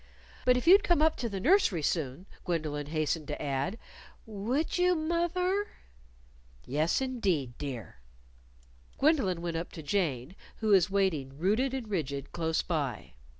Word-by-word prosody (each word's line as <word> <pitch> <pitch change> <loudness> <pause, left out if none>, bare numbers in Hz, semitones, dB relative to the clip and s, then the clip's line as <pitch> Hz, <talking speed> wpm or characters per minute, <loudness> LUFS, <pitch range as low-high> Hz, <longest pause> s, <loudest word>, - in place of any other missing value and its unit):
"But 250 0 +5
if 250 - -2
you'd 390 +4 +8
come 345 -5 +3
up 315 0 +3
to 235 - -2
the 195 -2 -4
nursery 265 - +3
soon," 150 +1 -1 0.2
Gwendolyn 155 -4 -2
hastened 155 0 -1
to - - -4
add. 140 +8 -2 0.5
"Would 235 - -2
you, 360 0 +4
moth 340 +2 -1
er?" 380 +3 +1 1.0
"Yes, 155 - +1
indeed, 190 - -1
dear." 120 - -6 1.0
Gwendolyn 260 - +2
went 170 -1 -2
up 165 - -5
to 160 - -8
Jane, 150 -3 -1 0.2
who 220 - -2
was 190 -3 +5
waiting, 160 -9 0
rooted 220 - +1
and 255 -4 -4
rigid, 145 -9 -3
close 160 -1 -1
by. 145 -9 -3
185 Hz, 150 wpm, -30 LUFS, -, 1.0 s, you'd